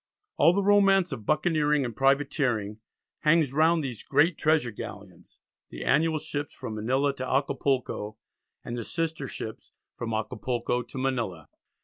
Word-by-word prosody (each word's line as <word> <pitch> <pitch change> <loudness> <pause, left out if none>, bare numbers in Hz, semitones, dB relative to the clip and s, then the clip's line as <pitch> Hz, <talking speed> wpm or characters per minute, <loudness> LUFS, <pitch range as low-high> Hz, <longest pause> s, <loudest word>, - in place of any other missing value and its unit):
All 165 - +6
the 200 +2 +1
romance 195 -3 +4
of 115 -7 -6
buccaneering 150 -2 +2
and 120 -2 -5
privateering 135 -6 +1 0.4
hangs 150 -3 +3
round 160 +2 +3
these 125 -5 -5
great 160 +3 +3
treasure 155 -6 +2
galleons, 95 -4 -10 0.3
the - - -7
annual 155 +3 +3
ships 145 -2 -5
from 110 - -6
Manila 130 +6 0
to 130 0 -4
Acapulco, 130 -5 -1 0.5
and 120 - -4
the 120 - -4
sister 160 -1 -3
ships 110 -3 -8 0.2
from 115 -1 -4
Acapulco 115 +3 -2
to 125 - -10
Manila. 120 - -2
135 Hz, 140 wpm, -27 LUFS, 115-155 Hz, 0.5 s, All